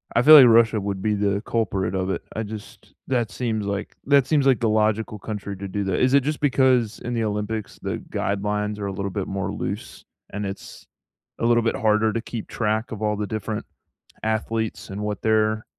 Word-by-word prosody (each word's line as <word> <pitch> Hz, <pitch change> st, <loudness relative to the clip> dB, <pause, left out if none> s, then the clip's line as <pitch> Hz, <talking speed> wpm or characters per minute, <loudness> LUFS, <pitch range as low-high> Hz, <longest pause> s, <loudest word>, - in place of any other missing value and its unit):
I 120 Hz, -, +4 dB
feel 155 Hz, +2 st, +10 dB
like 130 Hz, -4 st, +10 dB
Russia 115 Hz, -2 st, +5 dB
would 100 Hz, -1 st, -3 dB
be 105 Hz, 0 st, +1 dB
the 100 Hz, 0 st, 0 dB
culprit 95 Hz, -5 st, -1 dB
of 95 Hz, 0 st, -1 dB
it. 95 Hz, -, -2 dB
I 110 Hz, -, -2 dB
just 105 Hz, 0 st, -10 dB
that 120 Hz, -5 st, 0 dB
seems 110 Hz, -4 st, -2 dB
like 100 Hz, 0 st, -4 dB
that 140 Hz, -2 st, +4 dB
seems 145 Hz, -3 st, +2 dB
like 130 Hz, -, +4 dB
the 115 Hz, -3 st, +1 dB
logical 110 Hz, 0 st, +1 dB
country 100 Hz, -2 st, -5 dB
to 100 Hz, 0 st, -6 dB
do 100 Hz, +1 st, -2 dB
that. 95 Hz, -2 st, 0 dB
Is 130 Hz, +1 st, +3 dB
it 140 Hz, -, +5 dB
just 150 Hz, +1 st, -2 dB
because 130 Hz, -5 st, +2 dB
in 120 Hz, -, -5 dB
the 115 Hz, -1 st, 0 dB
Olympics, 105 Hz, 0 st, -3 dB
the -, -, -2 dB
guidelines 105 Hz, +1 st, -2 dB
are 100 Hz, -, -3 dB
a 95 Hz, -, -4 dB
little 100 Hz, 0 st, -3 dB
bit 100 Hz, -1 st, -3 dB
more 95 Hz, 0 st, -3 dB
loose, 105 Hz, +2 st, -6 dB, 0.3 s
and 105 Hz, 0 st, -4 dB
it's 95 Hz, 0 st, -8 dB, 0.5 s
a -, -, 0 dB
little 120 Hz, -1 st, +4 dB
bit 115 Hz, -, 0 dB
harder 110 Hz, 0 st, +2 dB
to 115 Hz, -, -1 dB
keep 115 Hz, -2 st, -6 dB
track 110 Hz, +1 st, -1 dB
of 110 Hz, -1 st, -6 dB
all 105 Hz, 0 st, +1 dB
the 105 Hz, -1 st, -2 dB
different 110 Hz, 0 st, -4 dB, 0.6 s
athletes 110 Hz, 0 st, -2 dB
and 100 Hz, +2 st, -5 dB
what 105 Hz, 0 st, -3 dB
they're 110 Hz, 0 st, +1 dB
110 Hz, 215 wpm, -23 LUFS, 100-115 Hz, 0.6 s, feel